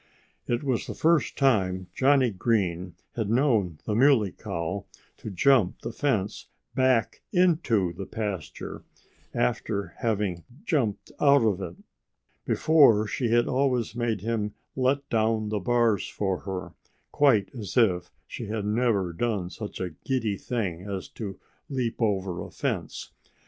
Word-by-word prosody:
It 120 +2 0
was 130 -4 -1
the - - -5
first 165 0 +2
time 95 -9 +2
Johnnie 135 -1 +4
Green 90 -4 0 0.2
had 110 -4 -1
known 115 - +2
the 105 - -1
Muley 115 -4 +4
Cow 85 +5 -4 0.3
to - - -7
jump 105 0 +3
the 115 - -3
fence 110 -8 -1 0.3
back 130 -3 +2
into 155 - +2
the 95 +2 -7
pasture, 100 -7 -5 0.5
after 100 +10 -1 0.7
jumping 130 - 0 0.2
out 140 -3 +5
of 100 -4 +1
it. 90 -2 -5 0.7
Before, 140 -10 +5
she 120 +2 -1
had 120 +1 +3
always 125 -4 +1
made 115 -5 -1
him 105 -1 -2 0.2
let 135 +2 +1
down 110 -1 +1
the 105 -1 -1
bars 115 -1 +2
for 95 -3 -1
her, 95 -3 -5 0.4
quite 120 -9 +3
as 110 -3 -6
if 95 -7 +3 0.2
she 115 - -7
had 105 -1 -3
never 105 -5 +1
done 95 -2 -1
such 105 -2 -7
a 90 -2 -3
giddy 115 - -2
thing 100 -6 -3
as 95 -1 -5
to 100 -4 -7 0.3
leap 125 -5 -2
over 95 -5 0
a - - -7
fence. - - -4
110 Hz, 140 wpm, -27 LUFS, 95-125 Hz, 0.7 s, out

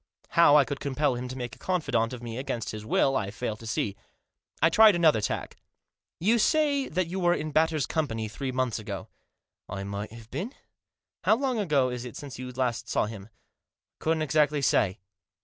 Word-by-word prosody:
How 165 -3 +6
I 145 - +5
could 140 +3 -4
compel 145 0 0
him 125 +1 -4
to 130 - -6
make 120 -3 -5
a - - -23
confidant 150 -11 0
of 125 -1 -7
me 115 +1 -5
against 120 -4 -3
his 110 -1 -7
will 135 +5 +2
I 100 -6 0
failed 110 0 -4
to 115 - -9
see. 105 -2 -1 0.6
I - - +5
tried 215 +1 +7
another 160 -9 +4
tack. - - -3 0.3
" - - -65
You 235 +1 +4
say 285 +2 +2
that 185 +3 0
you 180 +3 -4
were 175 -1 +3
in 155 -1 -4
Batters' 155 -2 +2
company 115 -9 -2
three 130 +5 -4
months 125 -3 -1
ago." 100 -3 -6 0.3
" - - -59 0.3
I 100 0 -4
might 100 +1 -5
have 115 0 -13
been." 230 +10 -4 0.3
" - - -65
How 220 - +6
long 255 -2 -1
ago 145 -10 +2
is 125 -1 -4
it 125 - -8
since 140 -3 -8
you 130 0 -5
last 125 -2 -2
saw - - +1
him? 105 -1 -8 0.2
" - - -58
" - - -66
I - - -15
couldn't 160 0 +1
exactly 150 -1 +2
say." 95 -6 +2
130 Hz, 220 wpm, -27 LUFS, 115-160 Hz, 0.6 s, tried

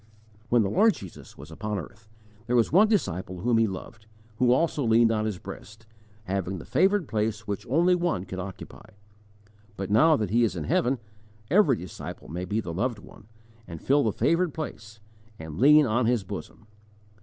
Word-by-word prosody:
When 120 -2 +4
the 100 - -1
Lord 220 - +4
Jesus 95 -4 -12
was 75 +4 -12
upon 105 +5 -4
earth, 105 +5 -10 0.4
there 125 - 0
was 115 -2 +3
one 195 +7 +6
disciple 95 - -2
whom 115 +2 +2
He 115 - +3
loved, 105 +3 -9 0.3
who 125 -1 +4
also 150 +2 +1
leaned 115 0 +4
on 110 -1 0
His 105 -4 -3
breast, 110 +4 -11 0.4
having 95 -1 -3
the 80 - -9
favoured 195 -4 +2
place 110 0 -2
which 105 +3 -5
only 170 +7 +3
one 175 - -1
could 95 0 -7
occupy. 95 0 -9 0.9
But 95 0 -4
now 155 +9 +5
that 105 -5 -3
He 120 +2 +3
is 105 -5 0
in 85 - -4
heaven, 125 - +1 0.5
every 170 - +5
disciple 90 -5 -9
may 90 +2 -4
be 105 +4 -1
the 85 -6 -5
loved 115 +6 -1
one, 105 0 -16 0.4
and 85 -1 -8
fill 140 - +2
the 110 - +1
favoured 170 - +1
place, 110 -8 -7 0.4
and 80 +1 -8
lean 150 +3 +7
on 120 0 +1
His 120 -4 +1
bosom. 105 +3 -9
110 Hz, 185 wpm, -26 LUFS, 95-135 Hz, 0.9 s, lean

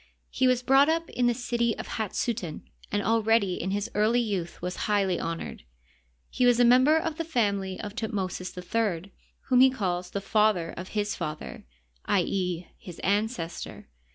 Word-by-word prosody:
He 260 - +2
was 250 -1 +2
brought 270 +3 +5
up 330 0 0
in 245 -1 +1
the 240 - +3
city 235 -2 0
of - - -5
Hat 220 -4 -3
suten, 200 -10 -2 0.3
and 205 0 0
already 225 -3 +2
in 185 - -2
his 200 +1 -2
early 215 +4 +3
youth 195 -7 -2
was 180 +1 -4
highly 195 -4 +2
honored. 165 0 -5 0.7
He 255 - 0
was 245 -1 +4
a 245 - +6
member 255 +6 +6
of 320 -1 -2
the 330 - -1
family 200 - -1
of 205 -1 -6
Thutmosis 190 -5 -3
HI, 190 -1 -2 0.3
whom 255 -2 +2
he 260 +1 +8
calls 180 -8 -2
the 200 - -3
father 200 -4 +2
of 185 +4 -7
his 205 0 0
father— 150 0 -6 0.4
i. 190 -3 +2
e., 180 -2 -2
his 175 -3 -10
ancestor. 205 - -2
210 Hz, 175 wpm, -27 LUFS, 185-240 Hz, 0.7 s, he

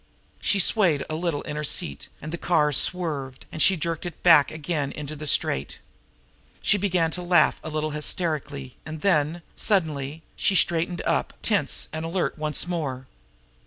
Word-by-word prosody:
She 200 - +1
swayed 180 -6 +3
a - - -1
little 165 -3 -2
in 150 - -5
her 150 - -3
seat, 70 - -2 0.2
and 155 +2 -6
the - - -2
car 150 -4 +2
swerved, 140 -5 -1
and 160 - -4
she 190 +4 +5
jerked 165 0 -2
it 175 -3 -8
back 160 -5 +7
again 155 -3 -3
into 150 0 -6
the 150 0 -6
straight. 70 - +1 0.8
She 205 - +2
began 180 -4 +1
to 180 - -4
laugh 175 0 +3
a - - -5
little 155 0 -2
hysterically 150 -4 -2
and 155 -1 -7
then, 165 -3 +1
suddenly, 155 -6 0
she 195 - +1
straightened 170 +1 +1
up, - - 0
tense - - +1
and 160 0 -3
alert 170 +2 -1
once 155 0 +1
more. 145 -7 -3
155 Hz, 165 wpm, -25 LUFS, 150-175 Hz, 0.8 s, back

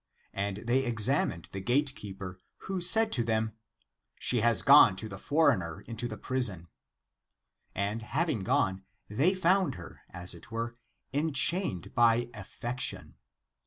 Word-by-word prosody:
And 100 +1 -3
they 130 +3 +2
examined 115 - 0
the 95 - -5
gate 135 +6 +1
keeper, 95 -5 -9 0.3
who 190 -2 -3
said 220 +5 +5
to 120 - +2
them, 110 -1 -1 0.3
" - - -57 0.3
She 125 - +2
has 115 -4 +3
gone 135 -8 +7
to 110 +3 -3
the 95 -2 -9
foreigner 120 - +1
into 115 +1 -3
the 110 -2 -7
prison." 105 -9 -2 1.1
And 100 +3 -2
having 150 +3 -1
gone, 95 -4 0 0.3
they 145 - +2
found 185 +1 +2
her, 90 -1 -11
as 90 +1 -2
it 85 +4 -12
were, 115 +1 -4 0.4
enchained 145 - +1
by 120 0 +3
affection. 120 +4 -4
115 Hz, 140 wpm, -29 LUFS, 100-140 Hz, 1.1 s, gone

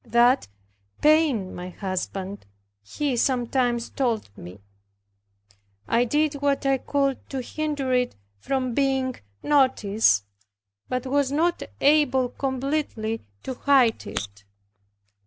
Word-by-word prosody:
That 240 +2 +3 0.5
pained 300 -11 +3
my 180 +1 -6
husband, 190 - -5 0.3
he 270 - -2
sometimes 245 -1 0
told 230 - -2
me. 90 +4 -11 1.3
I 235 +1 +3
did 295 +2 0
what 280 -1 +1
I 270 -1 +2
could 275 -1 -1
to 270 - -3
hinder 290 -2 -2
it 250 -1 +1 0.2
from 255 - -1
being 265 -1 +1 0.3
noticed, 220 - +3 0.6
but 255 +1 -2
was 275 0 +1
not 335 +4 +1 0.2
able 275 -4 +4
completely 265 -5 -2 0.2
to - - -4
hide 255 -3 +3
it. 100 +1 -6
255 Hz, 105 wpm, -25 LUFS, 225-280 Hz, 1.3 s, able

